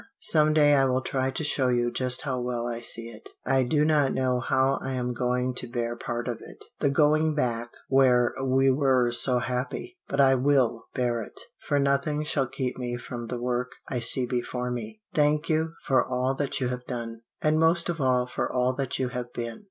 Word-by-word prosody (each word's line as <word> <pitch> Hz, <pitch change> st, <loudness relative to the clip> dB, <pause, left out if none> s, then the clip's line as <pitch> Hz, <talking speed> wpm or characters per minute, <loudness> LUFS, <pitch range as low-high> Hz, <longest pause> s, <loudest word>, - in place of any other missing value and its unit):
Some 155 Hz, -1 st, +4 dB
day 145 Hz, -1 st, +5 dB
I 135 Hz, -1 st, +4 dB
will 130 Hz, 0 st, 0 dB
try 130 Hz, 0 st, -1 dB
to 135 Hz, +4 st, -4 dB
show 140 Hz, -3 st, +1 dB
you 120 Hz, -1 st, +1 dB
just 125 Hz, 0 st, -1 dB
how 130 Hz, -3 st, -2 dB
well 120 Hz, -1 st, -2 dB
I 120 Hz, -1 st, -4 dB
see 115 Hz, 0 st, -3 dB
it. 110 Hz, -1 st, -12 dB, 0.2 s
"I 135 Hz, 0 st, +3 dB
do 150 Hz, +4 st, +2 dB
not 150 Hz, -3 st, +2 dB
know 130 Hz, -1 st, +1 dB
how 130 Hz, +2 st, +1 dB
I 135 Hz, -, -4 dB
am 125 Hz, -1 st, -2 dB
going 125 Hz, +1 st, -1 dB
to 125 Hz, -, -4 dB
bear 120 Hz, -1 st, -3 dB
part 120 Hz, +1 st, -4 dB
of 120 Hz, -2 st, -3 dB
it -, -, -12 dB
the 145 Hz, -, +2 dB
going 155 Hz, +2 st, +3 dB
back 120 Hz, -4 st, -1 dB, 0.2 s
where 125 Hz, -3 st, +4 dB
we 135 Hz, 0 st, +3 dB
were 130 Hz, -3 st, +2 dB
so 125 Hz, +1 st, +3 dB
happy. 125 Hz, -, -4 dB
But 140 Hz, -, -3 dB
I 135 Hz, -1 st, +6 dB
will 125 Hz, -4 st, +1 dB
bear 120 Hz, -2 st, 0 dB
it, 105 Hz, -, -10 dB, 0.3 s
for 145 Hz, -, +2 dB
nothing 140 Hz, +2 st, +1 dB
shall 140 Hz, -3 st, 0 dB
keep 130 Hz, -1 st, -4 dB
me 120 Hz, -1 st, -3 dB
from 120 Hz, -1 st, -7 dB
the 125 Hz, +1 st, -4 dB
work 125 Hz, +1 st, -2 dB, 0.2 s
I 125 Hz, -, -1 dB
see 125 Hz, +2 st, +4 dB
before 125 Hz, 0 st, -3 dB
me. 110 Hz, -3 st, -6 dB
"Thank 150 Hz, +1 st, +2 dB
you 160 Hz, +1 st, 0 dB
for 135 Hz, -, +3 dB
all 130 Hz, +1 st, -1 dB
that 140 Hz, +1 st, -2 dB
you 125 Hz, -2 st, -1 dB
have 125 Hz, 0 st, -5 dB
done, 115 Hz, -2 st, -5 dB, 0.2 s
and 155 Hz, +1 st, +2 dB
most 165 Hz, +1 st, +3 dB
of 165 Hz, -3 st, -2 dB
all 125 Hz, -1 st, +2 dB
for 125 Hz, -, -3 dB
all 125 Hz, 0 st, +1 dB
that 135 Hz, -2 st, -2 dB
you 130 Hz, -1 st, -1 dB
have 125 Hz, -1 st, -5 dB
been. 115 Hz, -1 st, -5 dB
130 Hz, 215 wpm, -26 LUFS, 120-140 Hz, 0.3 s, I